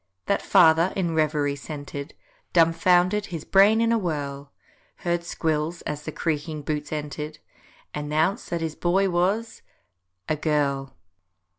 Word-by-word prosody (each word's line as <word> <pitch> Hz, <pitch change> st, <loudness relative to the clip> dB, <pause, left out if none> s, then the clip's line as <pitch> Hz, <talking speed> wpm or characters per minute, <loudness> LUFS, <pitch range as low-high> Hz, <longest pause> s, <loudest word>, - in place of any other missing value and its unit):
That 200 Hz, -, +1 dB
father, 165 Hz, +2 st, +5 dB
in 175 Hz, -4 st, 0 dB
reverie 150 Hz, -2 st, +1 dB
centr'd, 145 Hz, 0 st, -7 dB, 0.4 s
Dumfoundered, 180 Hz, +4 st, +3 dB
his 165 Hz, -4 st, -6 dB
brain 200 Hz, +3 st, +5 dB
in 230 Hz, 0 st, +2 dB
a 230 Hz, -, +3 dB
whirl, 145 Hz, -6 st, -4 dB, 0.5 s
Heard 175 Hz, 0 st, 0 dB
Squills—as 155 Hz, -2 st, -2 dB
the 155 Hz, -, -4 dB
creaking 155 Hz, -1 st, -3 dB
boots 150 Hz, 0 st, -3 dB
enter'd,— 150 Hz, 0 st, -5 dB, 0.6 s
Announce 155 Hz, +7 st, -1 dB
that 170 Hz, -1 st, -2 dB
his 160 Hz, -1 st, -2 dB
Boy 190 Hz, +4 st, +1 dB
was—a 155 Hz, -, -3 dB
GIRL. 140 Hz, -3 st, -1 dB
160 Hz, 120 wpm, -25 LUFS, 150-175 Hz, 0.6 s, father